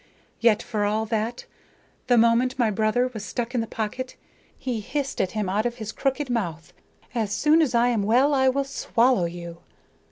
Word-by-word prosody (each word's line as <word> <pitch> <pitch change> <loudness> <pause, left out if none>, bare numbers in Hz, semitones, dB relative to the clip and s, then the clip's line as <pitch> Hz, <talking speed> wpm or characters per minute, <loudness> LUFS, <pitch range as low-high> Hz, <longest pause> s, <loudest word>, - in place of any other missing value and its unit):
Yet, 230 -3 +3
for 215 -4 -2
all 215 +2 0
that, 225 +2 -2 0.6
the 245 -1 +4
moment 235 +3 +3
my 235 -4 +2
brother 220 +5 +1
was 215 -3 -6
stuck 235 +5 -4
in 245 - +1
the 225 - -4
pocket 225 +4 -4 0.4
he 250 -4 -3
hissed 275 +5 -3
at 185 - -2
him 215 -3 -1
out 210 +5 +1
of 240 - -5
his 220 -3 -6
crooked 275 +3 -1
mouth: 175 -10 -3 0.4
"'As 220 -4 -1
soon 305 +9 +4
as 280 -6 +1
I 235 +1 +4
am 230 -4 +1
well, 250 +8 +3
I 265 -1 +4
will 275 +2 0
swallow 255 -6 +1
you.' 170 0 -7
230 Hz, 190 wpm, -25 LUFS, 210-255 Hz, 0.6 s, the